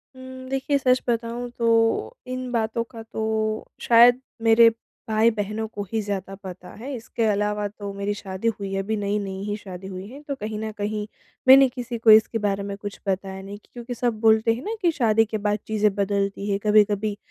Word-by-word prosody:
उम, 260 0 -10
देखिए, 270 +1 0
सच 255 -2 +2
बताऊँ 235 +1 -2
तो 230 - +2
इन 255 0 -4
बातों 230 0 0
का 230 -3 -9
तो 220 0 -6 0.6
शायद 240 +2 +6 0.2
मेरे 225 0 +7 0.4
भाई-बहनों 220 -1 +1
को 205 -2 -6
ही 225 - 0
ज़्यादा 195 -2 -4
पता 180 -1 -9
है 270 +4 -6
इसके 230 0 -4
अलावा 210 0 0
तो 205 0 -7
मेरी 200 +1 -2
शादी 195 +1 -5
हुई 195 -1 -4
है, 195 - 0
अभी 220 +3 -2
नई-नई 200 -1 -2
ही 205 0 -2
शादी 190 -2 -9
हुई 185 0 -7
है, 270 +6 -11
तो 285 -1 -4
कहीं 215 -3 -5
न 220 0 -4
कहीं 210 0 -2 0.4
मैंने 270 +1 +9
किसी 245 -1 -5
को 225 -1 +5
इसके 220 +1 +6
बारे 200 -1 0
में 200 0 -4
कुछ 205 0 -7
बताया 190 0 -2
नहीं 200 +1 -8
कि 210 - -25
क्योंकि 245 0 -6
सब 235 -2 -1
बोलते 220 +1 +4
हैं 235 - -6
ना 440 +2 -2
कि 345 - +3
शादी 225 -6 +3
के 215 0 -3
बाद 210 0 -1
चीज़ें 210 -2 +2
बदलती 200 0 -1
है 195 - +1
कभी-कभी। 210 -1 +3
215 Hz, 200 wpm, -24 LUFS, 205-235 Hz, 0.6 s, मैंने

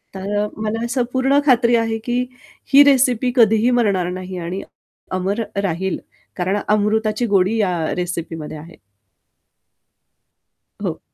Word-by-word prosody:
तर 200 +2 -3
अ, - - -1
मला 220 +1 -2
असं 245 +1 0
पूर्ण 270 +2 +3
खात्री 240 -2 +4
आहे, 225 -1 0
की 240 +2 -2 0.5
ही 285 +1 +10
रेसिपी 255 -3 +3
कधीही 225 +1 +4
मरणार 185 -5 +1
नाही 185 0 -6
आणि 175 +3 -4 0.5
अमर 190 +4 -1 0.2
राहील. 190 +1 -1 0.4
कारण 185 +3 0
अमृताची 215 +2 +1
गोडी 195 +4 +3
या 195 -4 +2 0.2
रेसिपीमध्ये 165 -3 -4
आहे. 160 +2 -12 2.1
हो. - - -3
210 Hz, 125 wpm, -20 LUFS, 185-235 Hz, 2.1 s, ही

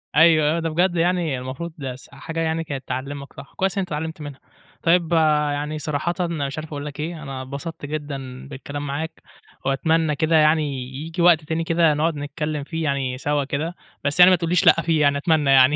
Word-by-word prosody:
أيوه، 160 0 +5
آه، - - 0
ده 165 0 -1
بجد 175 +3 +1
يعني 170 -4 +1
المفروض 140 +6 -6
ده 130 -3 -5
س 130 - -15
حاجة 165 +4 -6
يعني 165 0 0
كانت 140 -4 -6
تعلِّمَك 140 +2 -5
صح، - - -12
كويس 190 +1 0
أنت 190 -2 0
اتعلمت 160 0 -4
منها. 145 -2 -8 0.4
طيب 170 0 +3 0.4
يعني 150 +1 -3
صراحةً 150 +3 -1
مش 145 -3 -3
عارف 155 0 -5
أقول 145 -1 -5
لَك 150 0 -7
إيه، 160 0 -4
أنا 135 -2 -5
اتبسطت 140 +4 -6
جدًا 140 -4 -6
بالكلام 145 +1 -6
معاك، 160 +4 -4 0.4
وأتمنى 155 +3 +1
كده 160 +3 +1
يعني 155 0 +5 0.3
ييجي 160 +5 -4
وقت 170 -3 +5
تاني 160 +2 -2
كده 165 -1 +3
نقعد 155 +2 0
نتكلم 150 +1 -3
فيه 160 +2 -4
يعني 135 -3 -1
سوا 145 +1 0
كده، 155 +5 -3 0.3
بس 140 +4 0
يعني 180 +1 +10
ما - - +6
تقولّيش 170 +1 +1
لأ 165 - +6
فيه 160 -1 +1
يعني 140 -1 +3
أتمنى 150 -2 +2
يعني 135 +1 +6
150 Hz, 200 wpm, -22 LUFS, 140-165 Hz, 0.4 s, يعني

